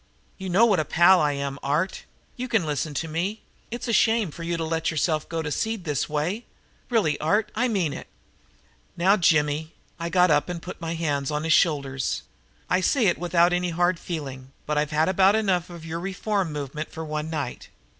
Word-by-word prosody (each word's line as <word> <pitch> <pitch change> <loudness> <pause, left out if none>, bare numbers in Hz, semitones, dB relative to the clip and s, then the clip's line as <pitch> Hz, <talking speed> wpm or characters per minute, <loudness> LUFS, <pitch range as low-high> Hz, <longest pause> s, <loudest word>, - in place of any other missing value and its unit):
You 190 -1 -5
know 195 +6 +5
what 205 -6 +3
a - - +2
pal 175 +4 +5
I 150 -1 +2
am, 140 0 -4
Art. 155 +7 -1 0.3
You 250 +1 -4
can 225 -8 +1
listen 150 0 -2
to 160 +5 -2
me. 180 +7 -3 0.3
It's 240 +2 -5
a 230 - 0
shame 220 -3 +3
for 170 - -10
you 170 0 -2
to 165 - -2
let 160 0 -1
yourself 155 -1 0
go 165 -1 -2
to 150 - -4
seed 220 +3 -2
this 150 -5 -1
way. 165 +10 -2 0.4
Really, 170 -12 +1
Art, 210 +7 +1
I 245 +4 +1
mean 185 - 0
it." - - -8 0.9
"Now, 190 +4 +4
Jimmy," 155 -3 +1 0.2
I 170 0 -3
got 180 -1 +4
up 150 +3 +2
and 175 -1 -3
put 180 +1 -9
my 165 0 -3
hands 145 -4 -1
on 150 0 -2
his 160 0 +3
shoulders. 135 - +1 0.4
"I 180 - +2
say 250 +4 +2
it 175 - +2
without 175 0 +3
any 180 0 0
hard 175 +1 +1
feeling, 135 -6 -6
but 150 - -1
I've 150 0 +1
had 155 +1 +2
about 190 +2 +4
enough 185 -5 +1
of 170 -2 -10
your 165 +1 -4
reform 195 0 -2
movement 150 +1 -5
for 160 0 -6
one 155 0 -3
night. 145 -6 -4
165 Hz, 205 wpm, -25 LUFS, 150-185 Hz, 0.9 s, know